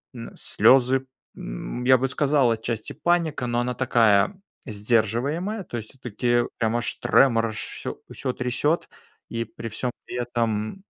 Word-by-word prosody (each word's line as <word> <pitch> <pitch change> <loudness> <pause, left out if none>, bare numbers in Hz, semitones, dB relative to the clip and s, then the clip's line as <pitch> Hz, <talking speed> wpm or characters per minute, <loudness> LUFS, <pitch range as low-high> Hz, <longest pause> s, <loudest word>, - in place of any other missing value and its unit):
м, 115 -1 -8
слезы, 130 0 +4 0.3
м, - - -6
я 130 0 +6
бы 135 +2 0
сказал, 140 -3 +2
отчасти, 115 0 -3
паника, 165 -7 0
но 120 0 0
она 125 +1 -1
такая 120 - +3 0.3
сдерживаемая, 120 - 0
то - - -7
есть 110 -1 -7
всё-таки 120 -1 0
прямо 115 +1 +1
аж 115 - -2
тремор, 115 -4 +3
аж 110 - -6
всё - - -5
всё 130 - -3
трясёт. 130 +6 0 0.4
И 115 0 -2
при 115 +1 -8
всём 120 +3 -3
при - - -7
этом, 120 - -2
120 Hz, 145 wpm, -24 LUFS, 115-135 Hz, 0.4 s, я